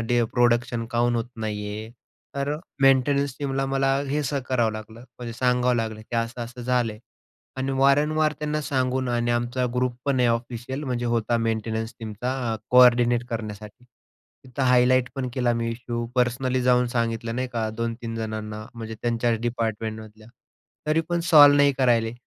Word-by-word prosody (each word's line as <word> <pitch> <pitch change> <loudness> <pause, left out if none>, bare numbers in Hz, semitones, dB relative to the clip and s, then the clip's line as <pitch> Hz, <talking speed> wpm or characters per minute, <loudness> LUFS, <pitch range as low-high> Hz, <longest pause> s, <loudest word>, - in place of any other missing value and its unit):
Day 120 +1 +1
production 120 -1 +2
काऊन 120 0 +1
होत 115 - -1 0.2
नाही 105 -1 -3
आहे? 110 +2 -6 0.4
तर 140 +2 -1 0.3
मेंटेनन्स 135 0 +3
टीमला 135 -1 -1
मला 135 0 +1
हे 150 +2 0
स 145 +1 -3
करावं 120 -4 +1
लागलं. 110 +1 -9 0.2
म्हणजे 120 -1 -6
सांगावं 125 0 +2
लागलं, 110 -1 -3
की 115 +2 -5
"असं-असं 120 +1 -4
झालंय" 120 -3 0 0.6
आणि 135 +1 -2
वारंवार 150 +3 +3
त्यांना 150 0 -2
सांगून 130 -2 -1
आणि 120 0 0
आमचा 120 +2 0
ग्रुपपण 125 +2 -1
आहे 120 - +4
ऑफिशियल. 120 +4 -3
म्हणजे 120 -2 -2
होता 115 +1 +1
मेंटेनन्स 115 0 -2
टीमचा 115 +3 -4 0.2
अ, - - -4
कोऑर्डिनेट 120 -1 +5
करण्यासाठी. 110 +1 -6 0.6
तिथं 130 +1 -4
हायलाइट 125 0 +4
पण 135 -2 -3
केला 125 -2 +1
मी 115 0 -1
इश्यू, 120 0 -4
पर्सनली 125 +1 +1
जाऊन 125 0 +3
सांगितलं, 115 -1 -2
नाही 130 0 -2
का 110 -2 -1
2-3 115 0 -4
जणांना 110 -1 -5
म्हणजे 110 -1 -6
त्यांच्याच 115 -1 +1
डिपार्टमेंटमधल्या 110 -2 -4 0.6
तरी 155 +2 +2
पण 170 0 0
सॉल्व्ह 145 -3 +8
नाही 145 0 +5
करून 130 -2 +1
राहिले 115 -1 +2
120 Hz, 155 wpm, -24 LUFS, 115-130 Hz, 0.6 s, सॉल्व्ह